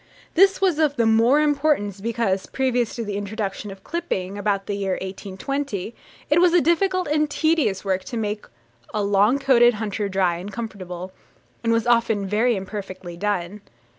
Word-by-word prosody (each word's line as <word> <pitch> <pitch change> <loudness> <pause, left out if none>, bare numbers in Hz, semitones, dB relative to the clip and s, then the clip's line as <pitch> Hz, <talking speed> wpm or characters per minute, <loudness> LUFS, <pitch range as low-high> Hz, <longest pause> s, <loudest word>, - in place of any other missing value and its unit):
This 390 +2 +5
was 365 -5 +2
of 300 -3 +2
the 235 - +2
more 230 +6 +4
importance, 285 -10 +1
because, 220 -4 -1
previous 250 -3 0
to 230 - -4
the 205 -1 -3
introduction 205 0 -4
of 195 0 -11
clipping, 200 - -3
about 205 -1 -1
the 205 - -3
year 195 -2 -1
1820, 200 +5 -4 0.3
it 310 +4 +4
was 355 -1 +5
a - - +7
difficult 365 +3 +1
and 300 0 +1
tedious 305 - +1
work 190 -1 0
to 235 - -5
make 210 -1 -3 0.5
a 210 - +1
long 205 +5 +3
coated 245 -4 +4
hunter 210 -1 -3
dry 185 -3 +1
and 190 +4 -7
comfortable, 185 -5 -6 0.5
and 230 - +1
was 230 -1 +2
often 230 -4 +2
very 220 +5 +2
imperfectly 190 -2 -6
done. 200 +1 -2
215 Hz, 165 wpm, -23 LUFS, 195-275 Hz, 0.5 s, a